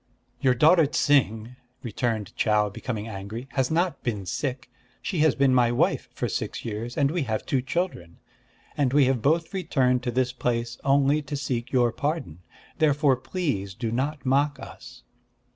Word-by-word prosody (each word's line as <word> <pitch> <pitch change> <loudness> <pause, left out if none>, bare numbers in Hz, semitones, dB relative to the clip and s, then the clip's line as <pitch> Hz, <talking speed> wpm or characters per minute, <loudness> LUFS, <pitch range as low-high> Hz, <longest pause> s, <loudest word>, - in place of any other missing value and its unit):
"Your 130 -2 +3
daughter 160 +4 +5
Ts'ing," 125 -5 +1 0.3
returned 110 -3 -2
Chau, 105 -1 +2
becoming 110 +1 -5
angry, 110 +4 -7
"has 130 -2 0
not 170 -1 0
been 105 -7 -3
sick. 130 +5 -3 0.3
She 180 - -3
has 155 -2 +4
been 135 -1 +3
my 120 -2 +4
wife 120 - 0
for - - -3
six - - -4
years; 115 +2 -5
and 140 -1 +2
we 175 0 -1
have 110 -2 -2
two 135 - 0
children; 135 - -3 0.6
and 135 -3 +1
we 145 -1 +5
have 130 -3 +1
both 160 - +1
returned 130 -9 +1
to 125 -1 -2
this 125 0 0
place 120 -1 -2
only 140 +2 +3
to 145 0 -5
seek 125 -4 -3
your 120 -3 +3
pardon. 145 - -3 0.4
Therefore 145 -3 +3
please 125 - -3
do 115 +2 -3
not 135 +4 -2
mock 140 +2 +2
us!" - - -11
130 Hz, 165 wpm, -25 LUFS, 115-145 Hz, 0.6 s, daughter